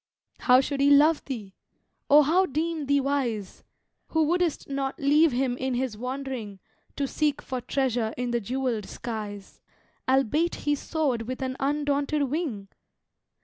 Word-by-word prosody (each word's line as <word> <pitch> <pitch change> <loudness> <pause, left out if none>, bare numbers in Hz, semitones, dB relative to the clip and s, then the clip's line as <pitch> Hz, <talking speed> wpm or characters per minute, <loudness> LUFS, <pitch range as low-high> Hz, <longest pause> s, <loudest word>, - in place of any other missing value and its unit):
How 250 0 +5
should 275 0 -2
he 280 - +5
love 295 +2 +5
thee? 215 -8 -6 0.6
or 295 +1 +8
how 360 +6 +3
deem 310 +1 -2
thee 285 0 +3
wise, 255 -8 -2 0.4
Who 320 -1 +1
wouldst 340 0 0
not 275 -1 -3
leave 300 +3 +4
him 250 0 0
in 260 -1 -2
his 250 -3 -2
wandering 250 -3 -5 0.4
To 280 - -1
seek 295 +1 0
for 255 -1 -5
treasure 245 -4 0
in 245 0 -2
the 235 0 0
jewelled 245 -2 -2
skies, 210 -4 -7 0.5
Albeit 270 +6 +2
he 295 - +3
soared 275 -6 -1
with 255 +1 -4
an 260 0 -2
undaunted 290 +1 0
wing? 265 - -3
270 Hz, 145 wpm, -26 LUFS, 245-290 Hz, 0.6 s, or